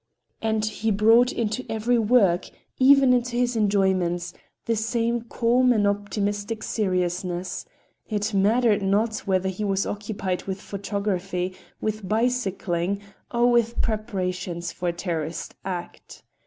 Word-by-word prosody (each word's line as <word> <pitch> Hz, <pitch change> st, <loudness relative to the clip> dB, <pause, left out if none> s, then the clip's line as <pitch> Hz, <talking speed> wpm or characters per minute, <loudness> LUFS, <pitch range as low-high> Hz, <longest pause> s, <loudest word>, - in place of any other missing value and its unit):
And 220 Hz, -1 st, 0 dB
he 215 Hz, +1 st, -2 dB
brought 225 Hz, +4 st, +5 dB
into 230 Hz, +2 st, -2 dB
every 230 Hz, +2 st, +1 dB
work, 205 Hz, -6 st, +3 dB, 0.3 s
even 270 Hz, -1 st, +6 dB
into 245 Hz, -1 st, 0 dB
his 245 Hz, 0 st, +1 dB
enjoyments, 190 Hz, -5 st, +1 dB, 0.3 s
the 230 Hz, -, +1 dB
same 230 Hz, +1 st, 0 dB
calm 240 Hz, +2 st, +2 dB
and 215 Hz, -4 st, +3 dB
optimistic 205 Hz, +1 st, -1 dB
seriousness,—it 185 Hz, +2 st, -3 dB
mattered 210 Hz, +2 st, +3 dB
not 215 Hz, +3 st, +1 dB
whether 190 Hz, -1 st, +1 dB
he 190 Hz, +3 st, -4 dB
was 195 Hz, -1 st, 0 dB
occupied 200 Hz, -3 st, -3 dB
with 190 Hz, 0 st, -4 dB
photography, 195 Hz, -2 st, -3 dB, 0.2 s
with 215 Hz, -3 st, -3 dB
bicycling 200 Hz, -5 st, 0 dB, 0.3 s
or 240 Hz, 0 st, +3 dB
with 235 Hz, -1 st, +2 dB
preparations 185 Hz, -6 st, -2 dB
for 180 Hz, -1 st, -2 dB
a -, -, -2 dB
terroristic 165 Hz, -2 st, -4 dB
act. 180 Hz, -2 st, -7 dB
205 Hz, 120 wpm, -25 LUFS, 185-230 Hz, 0.3 s, even